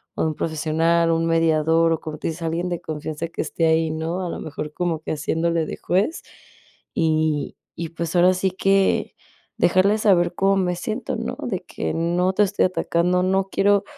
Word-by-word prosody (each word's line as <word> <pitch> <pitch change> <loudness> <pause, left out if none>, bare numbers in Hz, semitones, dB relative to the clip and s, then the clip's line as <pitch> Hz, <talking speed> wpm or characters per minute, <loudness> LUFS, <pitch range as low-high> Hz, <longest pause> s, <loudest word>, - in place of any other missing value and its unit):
o - - -2
de - - +2
un 155 - -4
profesional, 165 +2 +1
un 165 0 +1
mediador, 165 0 +3
o 160 - -2
como 155 -1 -6
te - - -3
dice 165 +1 -5
alguien 170 +2 -1
de 175 -1 -3
confianza 155 +1 -5
que - - -4
esté 165 - -1
ahí, 160 0 +2
¿no? 165 +4 -3
A - - -3
lo - - -5
mejor 150 0 -6
como 170 -3 -2
que - - -5
haciéndole 165 +2 0
de - - -6
juez, 195 - 0 0.7
y 155 -3 0 0.2
y 165 -1 -4
pues, 170 +1 -4
ahora 180 +1 +5
sí 190 +1 +1
que 195 +1 +1 0.4
dejarle 185 +4 +3
saber 175 -4 +3
cómo 195 0 +3
me 180 -2 0
siento, 175 - -4
¿no? - - -4
De - - -2
que: 80 - -4
"No 175 +3 +1
te 210 - +3
estoy 200 0 +1
atacando, 180 0 +1
no 190 +1 +1
quiero 200 0 +3
170 Hz, 195 wpm, -22 LUFS, 160-185 Hz, 0.7 s, ahora